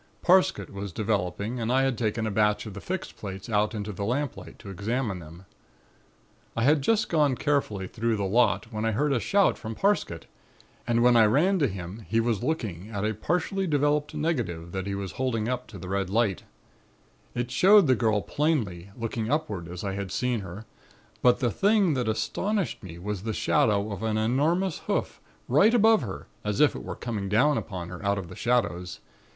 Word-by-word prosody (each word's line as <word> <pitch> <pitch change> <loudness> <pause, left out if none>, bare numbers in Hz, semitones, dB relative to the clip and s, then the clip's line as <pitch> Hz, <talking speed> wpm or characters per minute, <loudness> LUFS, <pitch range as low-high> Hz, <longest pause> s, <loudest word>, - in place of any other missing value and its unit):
Parsket 185 +1 +3
was 100 0 -5
developing 105 +3 -2
and 115 +1 -1
I 130 +1 +3
had 135 -2 +1
taken 110 0 -1
a 110 - -1
batch 105 +1 +2
of 105 - -7
the 105 - -8
fixed 185 0 -4
plates 95 -1 -7
out 105 +1 +1
into 105 0 -4
the 100 - -4
lamplight 130 +5 -3
to 100 - -10
examine 105 +1 -2
them. 85 +3 -12 1.1
"I 115 - +1
had 145 +3 +4
just 220 +9 +2
gone 150 -5 +2
carefully 120 -10 -1
through 115 +3 -1
the 100 - -2
lot 110 +1 +2
when 110 0 -2
I 110 0 +1
heard 145 +6 +1
a 125 - +2
shout 200 - +2
from 110 -1 -6
Parsket 195 - 0 0.6
and 120 0 +2
when 125 0 +5
I 115 -2 +7
ran 175 - +3
to 145 - +3
him 95 +1 -7
he 115 - +2
was 115 -3 0
looking 110 - -3
at 105 -2 -3
a 110 - 0
partly 180 - -1
developed 145 0 +1
negative 115 - -2
which 95 0 -3
he 100 - -2
was 100 -1 -4
holding 115 -4 -1
up 125 0 -2
to 105 - -10
the 90 0 -8
red 95 0 -1
lamp. 105 -2 +1 0.9
It 120 0 -2
showed 195 +8 +6
the 130 - +4
girl 110 -4 +1
plainly, 110 - -1
looking 115 -1 -3
upward 110 - -1
as 90 0 -7
I 100 -1 -2
had 100 -1 -4
seen 125 +2 0
her, 100 +2 -8 0.6
but 125 +1 +4
the 120 -3 +2
thing 200 - +3
that 125 -4 -1
astonished 180 - -1
me 90 -5 -9
was 100 +2 -4
the 110 +2 -3
shadow 105 0 +1
of 100 - -5
an 110 -1 0
enormous 150 - +1
hoof, - - -2 0.3
right 200 - +5
above 225 -1 +5
her, 95 - -6 0.2
as 105 -1 -2
if 150 -1 +4
it - - -6
were - - -5
coming 105 -5 -4
down 125 +9 +4
upon 90 -8 -5
her 90 +2 -8
out 100 0 +1
of 90 -4 -5
the - - -9
shadows. 100 -8 -1
110 Hz, 200 wpm, -27 LUFS, 100-140 Hz, 1.1 s, I